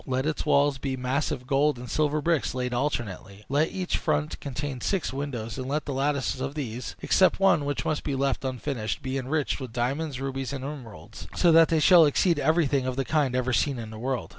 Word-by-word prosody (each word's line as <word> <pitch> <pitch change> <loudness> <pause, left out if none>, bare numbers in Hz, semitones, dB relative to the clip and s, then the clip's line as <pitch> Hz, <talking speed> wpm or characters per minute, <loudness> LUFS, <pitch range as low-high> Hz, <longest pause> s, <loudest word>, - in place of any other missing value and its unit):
Let 130 +1 0
its 155 -1 -2
walls 140 -1 +3
be 135 0 -3
massive 130 +1 -2
gold 140 +1 +2
and 125 +1 -8
silver 150 +2 0
bricks 165 -6 +1
laid 125 -1 -2
alternately. 110 -6 -3
Let 145 +4 +2
each 185 -1 -2
front 150 -1 -1
contain 135 -1 -5
six 190 -9 -1
windows, 130 -4 -4
and 130 - -4
let 145 +1 -1
the 140 - -3
lattices 135 -1 -1
of 135 +2 -3
these 125 -4 -5
(except 185 0 +3
one, 185 -7 +4
which 145 0 -2
must 155 - -1
be 140 - -2
left 135 0 0
unfinished) 130 -3 -3
be 130 +1 -2
enriched 145 +3 -1
with 130 -4 -6
diamonds, 135 +4 -2
rubies, 135 0 -3
and 135 -1 -5
emeralds, 135 -7 -9
so 175 - +4
that 165 0 +7
they 160 - +2
shall 170 +1 +7
exceed 165 +2 +2
everything 145 -3 +2
of 130 - -2
the 135 0 -1
kind 145 -4 +1
ever 130 0 0
seen 140 +1 +1
in 110 -2 -7
the 110 - -8
world. 130 +1 -2
135 Hz, 215 wpm, -26 LUFS, 130-150 Hz, -, that